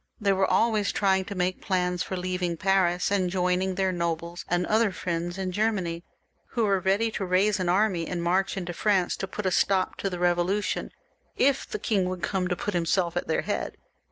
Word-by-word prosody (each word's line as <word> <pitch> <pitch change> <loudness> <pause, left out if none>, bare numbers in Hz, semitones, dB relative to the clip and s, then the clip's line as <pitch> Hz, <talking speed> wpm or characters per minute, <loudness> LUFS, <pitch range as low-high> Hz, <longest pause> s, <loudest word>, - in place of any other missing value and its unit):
They 200 -3 +2
were 190 0 +1
always 215 -3 +2
trying 190 -1 +2
to 200 - -6
make 185 0 -1
plans 180 -2 0
for 190 - -3
leaving 180 -1 -2
Paris 185 -1 +2
and 190 -3 +1
joining 180 +1 0
their 190 0 +1
nobles 170 0 -3
and 175 +1 +1
other 215 +1 +2
friends 175 -1 -3
in 190 -1 -2
Germany, 185 -5 -1 0.5
who 235 - +1
were 200 -2 +2
ready 200 +5 +1
to 205 - -3
raise 190 +2 +2
an 180 -1 0
army 185 -3 +2
and 175 -1 -3
march 190 +3 +1
into 175 -2 -4
France 190 -1 +1
to 195 - -4
put 210 +2 -5
a 185 - +2
stop 190 0 +1
to 195 - -2
the 180 - -4
Eevolution, 175 +3 0 0.5
if 275 +1 +2
the 425 - -3
king 200 - 0
would 180 -1 -5
come 185 0 0
to 180 - -1
put 205 - -3
himself 175 0 +1
at - - -2
their - - 0
head. - - -3
185 Hz, 205 wpm, -26 LUFS, 175-200 Hz, 0.5 s, They